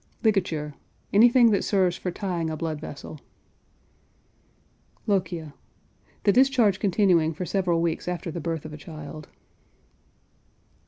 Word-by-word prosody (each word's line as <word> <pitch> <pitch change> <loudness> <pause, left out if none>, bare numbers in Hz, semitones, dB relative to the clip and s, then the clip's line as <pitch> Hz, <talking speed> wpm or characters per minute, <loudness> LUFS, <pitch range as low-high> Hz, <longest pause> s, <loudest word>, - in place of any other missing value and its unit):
LIGATURE. 175 -9 0 0.4
Anything 235 +2 +6
that 200 - +1
serves 185 -3 +2
for 185 - -4
tying 175 -3 -3
a 155 - -4
blood 155 -2 -3
vessel. 150 0 -8 1.9
LOCHIA. 175 -7 -1 0.7
The 205 - +5
discharge 245 -5 +4
continuing 180 -5 +2
for 180 - -4
several 175 -3 0
weeks 165 0 -2
after 175 -1 -3
the 170 - -5
birth 165 -1 -3
of 155 - -8
a - - -7
child. 155 -1 -9
175 Hz, 120 wpm, -25 LUFS, 160-200 Hz, 1.9 s, Anything